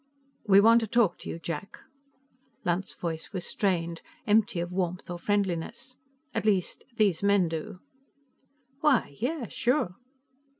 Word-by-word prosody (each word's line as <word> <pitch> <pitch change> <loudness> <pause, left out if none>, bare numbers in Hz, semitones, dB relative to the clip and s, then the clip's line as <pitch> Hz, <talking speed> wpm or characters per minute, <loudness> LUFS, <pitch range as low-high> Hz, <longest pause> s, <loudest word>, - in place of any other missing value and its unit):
"We 195 -1 +7
want 230 +3 +6
to 225 - -2
talk 220 -5 +2
to - - -8
you, - - -4
Jack." 170 +6 -6 0.9
Lunt's 175 +2 0
voice 165 -2 -4
was 185 -4 -4
strained, 170 -4 -1 0.2
empty 210 -3 +3
of 175 +1 -3
warmth 180 0 -2
or 175 - -5
friendliness. 205 +6 -1 0.4
"At - - -1
least, 195 -4 +1
these 200 -6 +3
men 200 -3 +4
do." 160 +2 -5 1.0
"Why, 275 - +2
yes. 260 -2 -2
Sure." 240 -8 +1
195 Hz, 135 wpm, -28 LUFS, 175-220 Hz, 1.0 s, We